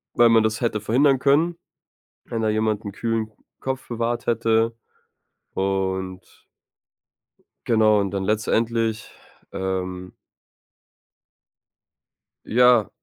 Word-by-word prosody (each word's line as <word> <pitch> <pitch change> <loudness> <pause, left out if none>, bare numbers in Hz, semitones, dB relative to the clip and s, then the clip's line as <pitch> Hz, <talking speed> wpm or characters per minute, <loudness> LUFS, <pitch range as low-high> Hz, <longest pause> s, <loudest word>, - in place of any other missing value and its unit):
Weil 120 -1 +6
man 115 -1 +5
das 110 0 -1
hätte 115 -3 -1
verhindern 135 +5 +3
können, 155 +6 +2 0.7
wenn 115 -1 -4
da 110 - +1
jemand 110 0 0
'n 100 - -5
kühlen 115 0 -2 0.3
Kopf 130 0 -4
bewahrt 120 +1 -2
hätte 115 0 +1 0.8
und 95 -1 -3 1.2
genau, 110 -2 +4
und 100 -1 -1
dann 95 -1 -2
letztendlich, 110 +1 0 0.4
ähm 95 -1 -4 2.3
ja, 120 -2 +4
110 Hz, 95 wpm, -23 LUFS, 100-120 Hz, 2.3 s, Weil